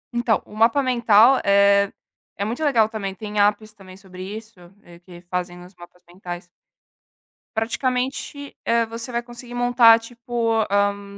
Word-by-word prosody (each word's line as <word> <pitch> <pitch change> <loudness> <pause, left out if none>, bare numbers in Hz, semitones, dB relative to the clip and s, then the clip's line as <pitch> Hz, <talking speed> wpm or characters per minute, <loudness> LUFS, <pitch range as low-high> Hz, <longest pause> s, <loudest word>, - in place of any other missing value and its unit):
Então, 240 -2 +1
o - - -16
mapa 230 +6 +3
mental, 235 0 +4
eh, 200 0 +4 0.5
é 200 - -2
muito 240 +8 -4
legal 235 -8 +3
também, 200 -4 -5
tem 210 +1 -5
apps 210 +1 +1
também 190 -2 -15
sobre 185 -2 -13
isso, 220 0 -9 0.2
é, 170 0 -16
que 175 -1 -14
fazem 180 0 -5
os 185 - -17
mapas 175 0 -16
mentais. 175 -1 -9 1.1
Praticamente, 255 +5 -3
hã, 230 0 +2
você 230 +2 -6
vai 235 0 -1
conseguir 240 0 -11
montar, 245 -2 +5
tipo, 235 -1 -2
hã, 200 0 +1
220 Hz, 150 wpm, -22 LUFS, 195-240 Hz, 1.1 s, montar